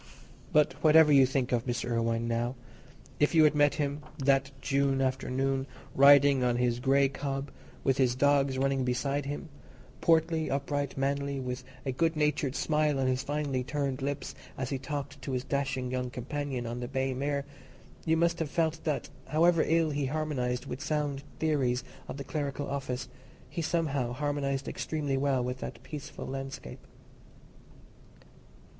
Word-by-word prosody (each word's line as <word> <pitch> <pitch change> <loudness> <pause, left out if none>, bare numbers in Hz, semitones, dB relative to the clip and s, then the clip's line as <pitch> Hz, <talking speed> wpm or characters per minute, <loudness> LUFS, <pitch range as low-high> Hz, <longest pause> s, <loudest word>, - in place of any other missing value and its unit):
But 150 -3 +4
whatever 155 -1 +7
you 140 - +7
may - - +7
think 135 -2 -1
of 120 0 0
Mr. 120 0 -2
Irwine 115 0 0
now, 120 +2 -1 0.6
if 150 +3 +3
you 160 - +7
had 150 - +5
met 145 -1 +3
him 145 0 -2 0.2
that 135 -1 +2
June 135 0 +1
afternoon 135 0 0 0.3
riding 140 -1 +7
on 120 -1 +2
his 120 -1 +1
grey 135 +2 +4
cob, 135 0 -4 0.3
with 135 -1 +2
his 125 -2 +3
dogs 140 0 +3
running 135 0 +1
beside 135 +3 -1
him—portly, 160 +2 -1
upright, 140 0 -2
manly, 140 0 -1
with 125 0 -4 0.2
a 135 - 0
good 160 +5 +1
natured 150 -2 +1
smile 150 -2 +1
on 135 - +1
his 130 0 +1
finely 145 -2 -1
turned 135 0 -2
lips 140 +1 -3 0.2
as 130 0 -3
he 135 - -1
talked 140 0 -5
to 130 +1 -4
his 125 -1 -1
dashing 135 -2 -2
young 125 -1 -2
companion 130 0 -4
on 120 +1 -4
the 120 - -4
bay 135 0 -1
mare, 140 +2 -1 0.6
you 160 0 +2
must 170 +1 +2
have 160 -3 -1
felt 160 +1 0
that, 150 -3 -1 0.2
however 165 +2 +4
ill 165 -1 +3
he 140 -1 -1
harmonized 130 -4 -2
with 130 - -6
sound 150 -2 -1 0.2
theories 135 -6 +1 0.2
of - - -6
the 140 - -5
clerical 145 -1 -3
office, 135 -2 -3 0.4
he 170 - -3
somehow 145 -7 0
harmonized 140 0 -1
extremely 145 -3 -2
well 135 -2 +1
with 125 +1 -3
that 115 - -7
peaceful 145 0 -7
landscape. 135 - -7
140 Hz, 160 wpm, -30 LUFS, 130-145 Hz, 0.6 s, whatever